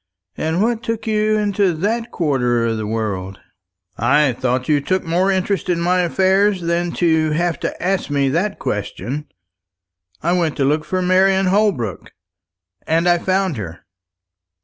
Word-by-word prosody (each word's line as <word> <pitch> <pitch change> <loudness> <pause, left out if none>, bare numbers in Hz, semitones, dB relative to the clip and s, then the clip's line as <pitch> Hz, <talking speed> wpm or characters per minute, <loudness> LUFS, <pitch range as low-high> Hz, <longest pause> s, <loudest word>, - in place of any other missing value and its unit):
"And 160 +5 0
what 230 0 0
took 230 -1 -4
you 215 0 +1
into 200 -3 +1
that 225 +8 -1
quarter 125 -7 0
of 115 -1 -1
the 110 -1 -4
world?" 100 -4 -3 0.6
"I 135 +4 +3
thought 125 +1 -1
you 150 -2 +2
took 185 +6 -1
more 175 +4 +1
interest 195 0 -1
in 175 -1 +1
my 180 +2 +2
affairs 190 +2 +2
than 170 +1 -1
to 160 -3 +2
have 170 0 0
to - - -4
ask 190 -2 0
that 145 +8 0
question. 125 +8 -4 1.0
I 170 - +1
went 170 -4 0
to 135 - +1
look 150 +2 +1
for 185 +4 -1
Marian 190 +1 +3
Holbrook, 185 - 0 0.7
and 165 +2 +2
I 175 0 +4
found 190 -4 0
her." 85 -5 -7
170 Hz, 150 wpm, -19 LUFS, 140-190 Hz, 1.0 s, I